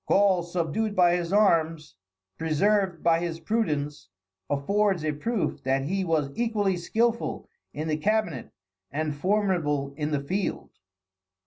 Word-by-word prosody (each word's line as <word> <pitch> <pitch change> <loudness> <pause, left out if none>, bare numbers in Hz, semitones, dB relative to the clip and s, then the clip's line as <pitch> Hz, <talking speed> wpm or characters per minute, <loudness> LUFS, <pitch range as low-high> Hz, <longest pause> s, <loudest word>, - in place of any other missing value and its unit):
Gaul, 195 -3 +4
subdued 180 +5 -2
by 175 -1 +5
his 175 -1 -2
arms, 165 -6 +2 0.5
preserved 185 +3 +1
by 165 -1 +4
his 170 -1 -3
prudence, 150 - -2 0.4
affords 185 +4 +1
a 155 - +1
proof 205 +9 -2
that 135 +1 0
he 190 +7 -1
was 155 -5 0
equally 210 -4 0
skillful 230 +7 -1 0.2
in 155 +2 -4
the 155 -1 0
cabinet 185 - 0 0.4
and 150 +1 -2
formidable 165 -6 0
in 150 0 -2
the 145 -2 0
field. 190 +6 -3
170 Hz, 130 wpm, -26 LUFS, 150-205 Hz, 0.5 s, by